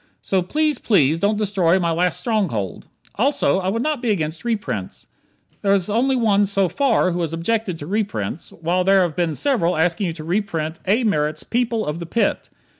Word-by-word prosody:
So 190 -1 +1
please, 300 - 0
please, 160 - +3
don't 205 +3 +1
destroy 190 -4 +2
my 170 -3 0
last 175 +1 0
stronghold. 175 - -2 0.3
Also, 270 -5 +2
I 190 0 -1
would 230 +4 -1
not 300 -4 -1
be 245 - -1
against 160 -5 -1
reprints. 205 - -3 0.6
There 200 0 +3
is 195 +1 -1
only 260 +5 +2
one 205 -4 +3
so 195 -1 +2
far 235 -4 +2
who 175 +1 -2
has 165 -1 -2
objected 185 +2 -1
to 145 - -8
reprints, 170 - -3
while 175 +3 -1
there 195 0 +4
have 170 -3 -2
been 170 -4 0
several 210 - +1
asking 175 +4 +1
you 165 - -3
to 160 -1 -9
reprint 165 -3 -2
A. 220 +6 +3
Merritt's 155 -7 0
"People 235 -2 -1
of 150 +2 -3
the 170 - -6
Pit." 230 +7 0
190 Hz, 190 wpm, -21 LUFS, 165-220 Hz, 0.6 s, there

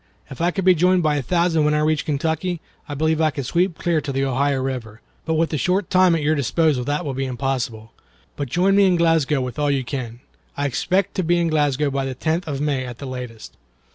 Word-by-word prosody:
If 135 - -7
I 170 - +3
could 185 +1 -3
be 185 - +7
joined 180 +1 +3
by 150 -1 +2
a - - 0
thousand 170 +3 +1
when 150 0 +2
I - - +2
reach 155 -1 +1
Kentucky, 160 +4 -1 0.3
I 145 - -4
believe 160 +2 +1
I 155 - +4
could 140 -3 -5
sweep 175 +4 0
clear 170 -3 0
to 145 - -4
the 135 0 0
Ohio 135 +1 +1
River. 125 -5 -4 0.3
But 160 - 0
with 160 +1 +1
the 155 - -1
short 185 +5 0
time 185 -2 +5
at 160 - -2
your 155 +2 +2
disposal 150 -1 +1
that 145 +3 -1
will 140 - -3
be 135 +1 -2
impossible. 125 -3 -3 0.4
But 140 -3 -4
join 190 +7 +2
me 200 -2 +5
at 175 - +2
Glasgow 160 -4 +2
with 125 +1 -5
all 145 -1 +1
you 135 -2 +1
can. 120 -3 -6 0.4
I 145 - -1
expect 185 +8 0
to 185 - +1
be 175 +1 +2
in 170 -1 +1
Glasgow 145 -2 +1
by 135 0 -1
the 130 -1 -4
tenth 160 +6 -1
of 140 -3 -3
May 145 -3 0
at 125 -2 -7
the 140 - -8
latest." 125 -4 -8
150 Hz, 245 wpm, -21 LUFS, 135-170 Hz, 0.4 s, be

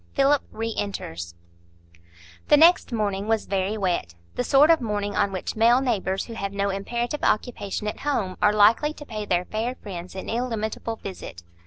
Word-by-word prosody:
Philip 275 0 +4
Re 225 0 -3
enters 85 - -5 1.1
The 295 - +6
next 330 -1 +5
morning 205 -3 -1
was 225 -1 +1
very 195 +2 -1
wet,—the 85 - -3
sort 280 +5 +5
of 325 - +3
morning 205 -3 -2
on 200 - +1
which 185 - -4
male 235 +3 +5
neighbours 200 -7 -1
who 230 - -9
have 200 -3 -4
no 200 0 0
imperative 240 +8 -3
occupation 210 -2 -1
at 210 - -4
home 220 -11 -1
are 210 - +5
likely 220 +8 +4
to 295 - -11
pay 215 -5 -5
their 180 -2 0
fair 225 +5 -3
friends 185 -5 -8
an 190 - -6
illimitable 225 -1 -2
visit. 180 - -9
210 Hz, 170 wpm, -24 LUFS, 195-240 Hz, 1.1 s, The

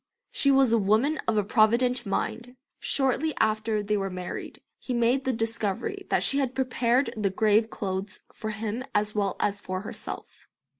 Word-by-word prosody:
She 280 - +1
was 270 -3 +5
a 230 - +4
woman 220 +10 +2
of 210 -3 +1
provident 240 +2 +3
mind. 240 +5 -3 0.2
Shortly 280 +3 +1
after 215 -1 +1
they 210 +1 0
were 195 -1 -2
married 180 -1 -6 0.2
he 250 - -3
made 240 +3 +2
the 260 - +2
discovery 225 - -2
that - - +2
she 275 - +2
had 260 -2 -1
prepared 255 -1 +1
the 210 -3 0
grave 215 +3 +3
clothes 195 -1 -4
for 220 - -5
him 215 +3 -3
as 210 0 +1
well 200 -3 0
as 205 0 0
for 185 0 -4
herself. 205 - -8
225 Hz, 165 wpm, -27 LUFS, 205-255 Hz, 0.2 s, was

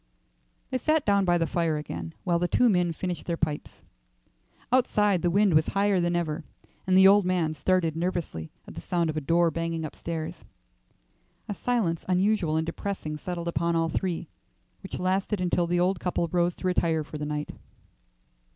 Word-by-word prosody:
They 255 - 0
sat 310 +3 +1
down 200 -1 +3
by 175 -1 +3
the 165 - +1
fire 165 -2 0
again 85 - -6
while 170 -2 +1
the 175 - +1
two 245 +6 +3
men 180 -4 +2
finished 175 +1 -4
their 170 -1 -1
pipes. 155 -2 -3 0.9
Outside, 210 -7 +3
the 175 - +2
wind 200 +1 +3
was 155 +1 +4
higher 200 -1 +2
than 175 0 +1
ever, 165 -2 -2 0.4
and 185 0 +4
the 190 0 +8
old 200 +1 +6
man 180 -4 0
started 165 +1 +1
nervously 165 - -3 0.2
at - - -9
the - - -7
sound 170 -3 0
of - - -10
a 155 - -1
door 170 +3 +3
banging 165 -1 -2
upstairs. 165 +2 -5 1.0
A 210 - -2
silence 200 -8 -1
unusual 185 -3 +2
and 160 - 0
depressing 170 -2 -4
settled 170 +2 -5
upon 170 +1 0
all 165 0 +1
three, 175 0 -2 0.5
which 190 - -6
lasted 190 +2 0
until 175 -1 +1
the 175 +1 +1
old 180 0 +1
couple 175 -1 -1
rose 175 0 +1
to - - -8
retire 165 -3 +1
for 150 0 -8
the 150 - -3
night. 150 0 -3
175 Hz, 180 wpm, -27 LUFS, 160-185 Hz, 1.0 s, the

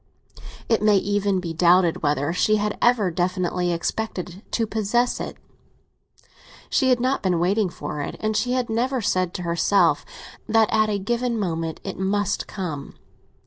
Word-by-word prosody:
It 225 -2 +2
may 210 -1 +5
even 200 -1 0
be 170 -2 -4
doubted 175 0 +3
whether 145 +1 0
she 215 +4 +2
had 210 0 -1
ever 230 -7 +3
definitely 180 0 -1
expected 180 +1 -3
to 230 - 0
possess 220 +3 0
it; - - -6 1.3
she 265 -3 +3
had 250 -1 +3
not 255 +3 0
been 180 -3 +1
waiting 195 +3 +1
for 150 -3 -6
it, - - -5
and 215 0 -1
she 245 +4 0
had 255 -2 0
never 250 +4 0
said 185 -4 0
to 180 - -4
herself 170 +4 +2 0.5
that 220 -1 +3
at 215 0 +3
a 205 - 0
given 235 +3 -1
moment 165 -4 -3
it 195 - -6
must 195 +1 0
come. 160 -8 -6
200 Hz, 160 wpm, -23 LUFS, 175-220 Hz, 1.3 s, may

